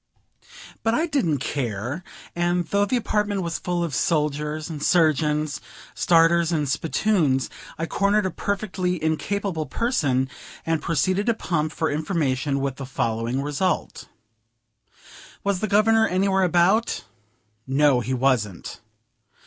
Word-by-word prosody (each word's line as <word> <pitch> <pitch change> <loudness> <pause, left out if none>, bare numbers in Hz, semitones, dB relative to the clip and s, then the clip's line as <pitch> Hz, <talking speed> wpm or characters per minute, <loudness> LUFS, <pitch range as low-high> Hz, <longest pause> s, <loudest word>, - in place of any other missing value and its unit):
But 225 +1 +1
I 320 - +2
didn't 260 - 0
care; 125 - -3 0.3
and, 175 0 +1
though 200 +3 +1
the 250 +5 0
apartment 210 -4 -1
was 170 -1 -3
full 175 -1 -1
of 165 -4 -3
soldiers, 150 0 0 0.2
surgeons, 155 -3 +2 0.3
starers, 170 0 +3
and 150 -3 0
spittoons, 150 -1 +1 0.3
I 165 - -2
cornered 200 +4 +1
a 190 - -1
perfectly 190 -2 -2
incapable 160 +1 -1
person, 135 - 0 0.4
and 165 -1 0
proceeded 185 - 0
to 230 - +3
pump 155 -7 -1
for 160 - -1
information 145 -3 -1
with 135 -1 -2
the 135 - -6
following 120 +1 -1
result: 150 +6 -2 1.4
"Was 200 -2 0
the 215 - -1
Governor 220 +2 +4
anywhere 190 +1 +1
about?" 185 +5 +2 0.6
No, 135 -1 +3
he 130 +2 -2
wasn't. 120 -8 -1
165 Hz, 125 wpm, -24 LUFS, 145-195 Hz, 1.4 s, Governor